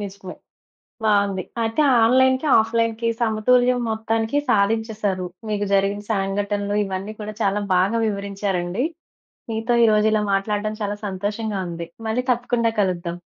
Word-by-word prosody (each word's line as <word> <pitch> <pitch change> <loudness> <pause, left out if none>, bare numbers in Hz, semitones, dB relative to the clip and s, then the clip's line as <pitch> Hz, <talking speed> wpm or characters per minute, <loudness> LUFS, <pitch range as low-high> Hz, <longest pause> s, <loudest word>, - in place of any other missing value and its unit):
నిజమే, 195 -2 -7 0.7
బావుంది. 200 -3 +2 0.2
అయితే 225 +6 0 0.2
ఆన్‌లైన్‌కి, 260 +4 +3
ఆఫ్‌లైన్‌కి 230 +1 0
సమతుల్యం 245 +3 +3
మొత్తానికి 225 +3 -1
సాధించేసారు. 210 -3 0 0.2
మీకు 205 -1 -1
జరిగిన 200 +1 +1
సంఘటనలు 205 +1 -1
ఇవన్నీ 195 +2 -5
కూడా 210 0 -5
చాలా 205 0 +1
బాగా 195 +6 +2
వివరించారండి. 200 -1 -2 0.7
మీతో 225 +2 -1
ఈరోజు 215 -1 +4
ఇలా 215 -1 +2
మాట్లాడటం 210 +2 -1
చాలా 205 0 -1
సంతోషంగా 205 +2 -3
ఉంది 170 0 -5 0.2
మళ్ళి 220 +3 0
తప్పకుండా 240 -1 +1
కలుద్దాం. 175 -3 -1
210 Hz, 115 wpm, -22 LUFS, 195-225 Hz, 0.7 s, ఈరోజు